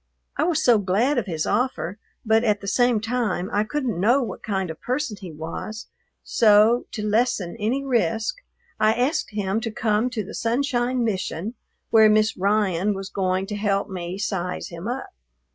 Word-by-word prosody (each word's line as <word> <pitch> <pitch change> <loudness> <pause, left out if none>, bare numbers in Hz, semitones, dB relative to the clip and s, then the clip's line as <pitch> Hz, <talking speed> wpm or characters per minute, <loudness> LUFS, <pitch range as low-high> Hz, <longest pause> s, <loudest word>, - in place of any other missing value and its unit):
I - - +1
was 340 -3 +1
so 235 -3 +6
glad 215 +9 +2
of 215 - -5
his 160 -4 -2
offer, 230 -6 -1 0.3
but 220 +1 +3
at 210 -3 +2
the 200 - -8
same 245 +2 +3
time 225 -5 -1
I 205 - +3
couldn't 245 - -2
know 240 +8 +4
what 235 - -6
kind 190 -5 -2
of 160 - -11
person 255 -2 -2
he 180 -3 -7
was; 165 +8 -6 0.3
so, 220 +1 +4
to 210 -2 -3
lessen 215 -4 +1
any 240 +6 0
risk, 225 - 0 0.4
I 215 0 +4
asked 255 +6 0
him 210 0 -1
to 230 - -2
come 220 +2 0
to 235 -4 -3
the 210 - -9
Sunshine 245 0 0
Mission, 195 -1 -2 0.4
where 220 -1 +7
Miss 215 +1 +3
Ryan 200 0 +1
was 195 0 -6
going 185 0 0
to 210 +1 -5
help 205 -1 0
me 180 -1 -5
"size 190 -3 -3
him 170 +3 -7
up." 250 +3 -4
215 Hz, 180 wpm, -23 LUFS, 195-240 Hz, 0.4 s, where